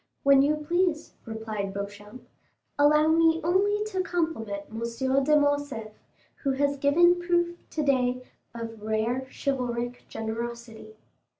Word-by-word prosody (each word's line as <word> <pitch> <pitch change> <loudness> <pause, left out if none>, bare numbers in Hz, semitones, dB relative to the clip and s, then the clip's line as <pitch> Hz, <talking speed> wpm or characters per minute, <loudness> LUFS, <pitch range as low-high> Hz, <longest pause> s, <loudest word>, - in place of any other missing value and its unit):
"When 275 -1 +6
you 295 +2 +3
please," 335 +1 -1
replied 215 -3 -4
Beauchamp; 205 +3 -8 0.5
"allow 300 +1 +5
me 325 0 +4
only 405 +5 +2
to 375 -2 0
compliment 315 - -2
M. 225 - -6 0.4
de 300 +2 +4
Morcerf, 285 -6 -1 0.5
who 275 -2 -1
has 285 +1 0
given 345 +6 +4
proof 345 0 +1
today 255 -4 0 0.3
of 225 -2 -7
rare 220 +4 -1
chivalric 245 -3 -3
generosity." 225 0 -6
270 Hz, 115 wpm, -27 LUFS, 225-315 Hz, 0.5 s, When